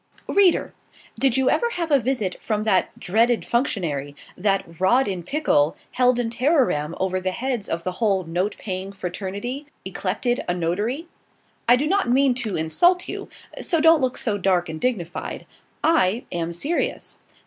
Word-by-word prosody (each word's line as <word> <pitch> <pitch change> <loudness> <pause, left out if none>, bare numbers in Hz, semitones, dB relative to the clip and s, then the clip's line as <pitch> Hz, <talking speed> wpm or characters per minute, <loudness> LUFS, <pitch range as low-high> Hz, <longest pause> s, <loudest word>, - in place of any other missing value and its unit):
READER! 390 -4 +3 0.5
did 265 -1 +3
you 265 -1 +2
ever 475 - +1
have 335 -3 -3
a 285 - +6
visit 230 -7 -2
from 215 -2 -1
that 195 -4 +2
dreaded 230 +5 +2
functionary 160 - -1 0.2
that 195 0 +1 0.2
rod 245 +8 +4
in 190 -3 -2
pickle, 170 - +1
held 250 -1 +3
in 230 -2 -1
terrorem 240 - +1
over 185 0 0
the 185 0 -1
heads 240 +2 -3
of 170 0 -2
the 185 - -2
whole 195 -1 +1
note 175 +5 -2
paying 190 -1 -4
fraternity, 200 +9 -5 0.2
yclepted 200 +6 -1
a 175 - +1
notary? 205 - -2 0.6
I 245 - +8
do 270 +4 0
not 390 -3 +1
mean 265 +1 +4
to 240 -5 -3
insult 350 - +2
you: - - -6 0.3
so 335 - +1
don't 325 -1 +6
look 255 -1 0
so 205 -4 -1
dark 180 -3 +1
and 160 0 -6
dignified. 185 -9 -3 0.4
I 240 - +3
am 170 -1 -2
serious. 285 - -2
215 Hz, 160 wpm, -23 LUFS, 185-265 Hz, 0.6 s, I